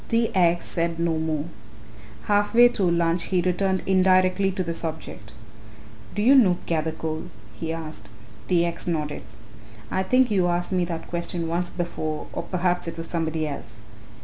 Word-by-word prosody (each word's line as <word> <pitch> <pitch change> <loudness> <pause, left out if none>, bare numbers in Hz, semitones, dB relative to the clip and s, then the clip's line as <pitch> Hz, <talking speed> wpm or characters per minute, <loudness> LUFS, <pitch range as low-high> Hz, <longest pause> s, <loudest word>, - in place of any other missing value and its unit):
T. 230 -1 +1
X. 175 -2 +3
said 170 0 -1
no 165 -1 0
more. 155 -2 -1 0.8
Half 205 +2 +1
way 240 +1 +8
through 195 -6 0
lunch 170 0 +1
he 185 - +1
returned 185 +1 0
indirectly 185 0 +3
to 185 -1 -1
the 170 -1 -3
subject. 160 -10 -6 0.8
"Do 205 - 0
you 255 +5 +7
know 205 -10 +5
Gathercole?" 160 -1 -2 0.3
he 160 +9 -4
asked. 155 -10 -7 0.4
T. 170 -2 +3
X. 170 0 -3
nodded. 150 -3 -2 0.7
"I 190 - +1
think 255 +5 +3
you 185 -3 +3
asked 175 +1 -1
me 180 -1 +1
that 165 -2 -5
question 170 -1 -3
once 175 +2 -1
before, 155 -3 -4
or - - -2
perhaps 180 -1 -1
it 165 - -5
was 165 - -4
somebody 160 -2 -2
else. 115 -6 -8
170 Hz, 165 wpm, -24 LUFS, 160-185 Hz, 0.8 s, way